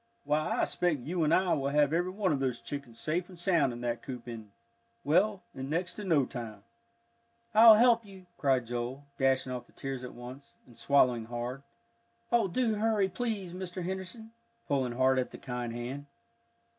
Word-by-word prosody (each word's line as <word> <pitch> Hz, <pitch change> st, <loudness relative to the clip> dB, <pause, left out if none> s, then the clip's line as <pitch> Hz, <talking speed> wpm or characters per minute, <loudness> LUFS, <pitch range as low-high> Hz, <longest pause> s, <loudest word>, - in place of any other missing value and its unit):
Why, 150 Hz, +1 st, +2 dB
I -, -, 0 dB
expect 170 Hz, -7 st, 0 dB
you 170 Hz, +6 st, -1 dB
and 155 Hz, -, +2 dB
I 185 Hz, +1 st, +3 dB
will 140 Hz, -1 st, 0 dB
have 145 Hz, +1 st, +3 dB
every 175 Hz, +2 st, +1 dB
one 190 Hz, -1 st, 0 dB
of 140 Hz, -, -1 dB
those 130 Hz, -3 st, -1 dB
chickens 140 Hz, -5 st, -7 dB
safe 170 Hz, +4 st, -1 dB
and 180 Hz, -, -12 dB
sound 170 Hz, -7 st, +2 dB
in 120 Hz, 0 st, -7 dB
that 120 Hz, -1 st, -2 dB
coop 125 Hz, -2 st, -8 dB
in 115 Hz, -3 st, -7 dB, 0.5 s
well, 185 Hz, +6 st, +2 dB
in 135 Hz, +1 st, -6 dB
next 175 Hz, +4 st, -1 dB
to 210 Hz, -, -7 dB
no 160 Hz, -8 st, +3 dB
time." 110 Hz, -6 st, -7 dB, 0.9 s
"I'll 220 Hz, 0 st, +10 dB
help 230 Hz, +1 st, +5 dB
you!" 195 Hz, -3 st, -14 dB
cried 130 Hz, -4 st, +2 dB
Joel, 120 Hz, +3 st, -4 dB, 0.2 s
dashing 135 Hz, -1 st, +2 dB
off 125 Hz, -1 st, -5 dB
the -, -, -24 dB
tears 135 Hz, -2 st, -5 dB
at 125 Hz, -, -8 dB
once, 125 Hz, +3 st, -10 dB
and 120 Hz, -, -18 dB
swallowing 125 Hz, -5 st, +3 dB
hard. 120 Hz, +3 st, -5 dB, 0.7 s
"Oh, 235 Hz, -4 st, +4 dB
do 225 Hz, +4 st, +1 dB
hurry, 210 Hz, -2 st, +1 dB
please, 195 Hz, -3 st, -3 dB
Mr. 185 Hz, 0 st, -5 dB
Henderson," 190 Hz, +5 st, -5 dB, 0.4 s
pulling 130 Hz, -4 st, 0 dB
hard 130 Hz, +1 st, +3 dB
at 125 Hz, -, -1 dB
the -, -, -10 dB
kind 125 Hz, -2 st, -4 dB
hand. 125 Hz, +5 st, -6 dB
145 Hz, 185 wpm, -30 LUFS, 125-185 Hz, 0.9 s, I'll